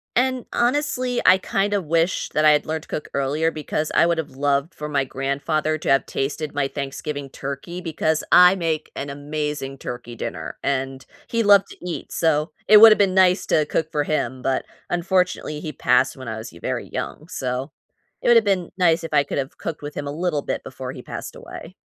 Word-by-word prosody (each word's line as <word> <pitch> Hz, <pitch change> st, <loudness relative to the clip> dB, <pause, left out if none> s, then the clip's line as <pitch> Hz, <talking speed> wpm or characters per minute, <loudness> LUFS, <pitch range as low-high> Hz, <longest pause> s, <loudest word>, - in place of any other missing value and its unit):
And 255 Hz, 0 st, +1 dB
honestly, 250 Hz, -1 st, 0 dB
I 185 Hz, +1 st, +8 dB
kinda 200 Hz, +2 st, 0 dB
wish 165 Hz, +1 st, 0 dB
that 155 Hz, -, 0 dB
I'd 150 Hz, -1 st, +5 dB
learned 160 Hz, 0 st, -3 dB
to -, -, -18 dB
cook 150 Hz, -, -4 dB
earlier 145 Hz, +4 st, 0 dB
because 155 Hz, 0 st, -3 dB
I -, -, +5 dB
would've 160 Hz, -5 st, -2 dB
loved 140 Hz, +3 st, 0 dB
for 150 Hz, 0 st, -6 dB
my 140 Hz, -2 st, +1 dB
grandfather 140 Hz, +4 st, -1 dB
to -, -, -4 dB
have 135 Hz, -, +3 dB
tasted 145 Hz, +2 st, -3 dB
my 140 Hz, -1 st, +1 dB
Thanksgiving 140 Hz, 0 st, -5 dB
turkey 140 Hz, +7 st, -6 dB
because 160 Hz, -1 st, -1 dB
I 180 Hz, +1 st, +8 dB
make 160 Hz, -3 st, -2 dB
an 140 Hz, 0 st, -4 dB
amazing 145 Hz, -1 st, -4 dB
turkey 120 Hz, -2 st, -7 dB
dinner -, -, -6 dB
and 135 Hz, -1 st, -2 dB, 0.2 s
he 230 Hz, -1 st, 0 dB
loved 200 Hz, -1 st, +6 dB
to -, -, -12 dB
eat, 170 Hz, -, -5 dB
so 155 Hz, -1 st, +1 dB, 0.2 s
it 215 Hz, -, +9 dB
would've 220 Hz, 0 st, +9 dB
been 195 Hz, -2 st, +3 dB
nice 185 Hz, 0 st, +4 dB
to 155 Hz, -, +3 dB
cook 160 Hz, 0 st, -1 dB
for 150 Hz, -, 0 dB
him, 130 Hz, -4 st, -2 dB
but 130 Hz, 0 st, -1 dB, 0.2 s
unfortunately, 180 Hz, -3 st, 0 dB
he 155 Hz, -, -5 dB
passed 135 Hz, -1 st, +2 dB
when 130 Hz, -, -9 dB
I 110 Hz, -1 st, -4 dB
was 110 Hz, -, -8 dB
y 85 Hz, -, -14 dB
very -, -, -3 dB
young. 155 Hz, -, -5 dB
So, 130 Hz, -4 st, -3 dB, 0.5 s
it -, -, -3 dB
would've 230 Hz, -2 st, +6 dB
been 190 Hz, -4 st, 0 dB
nice 170 Hz, -3 st, +3 dB
if 165 Hz, -, -6 dB
I 145 Hz, -1 st, +5 dB
could've 135 Hz, -1 st, -4 dB
cooked 160 Hz, -3 st, -5 dB
with 145 Hz, 0 st, -6 dB
him 145 Hz, -, -5 dB
a 140 Hz, -, -3 dB
little 160 Hz, -2 st, -1 dB
bit -, -, -4 dB
before -, -, -7 dB
he -, -, -10 dB
passed -, -, -7 dB
away. -, -, -10 dB
155 Hz, 200 wpm, -22 LUFS, 140-180 Hz, 0.5 s, it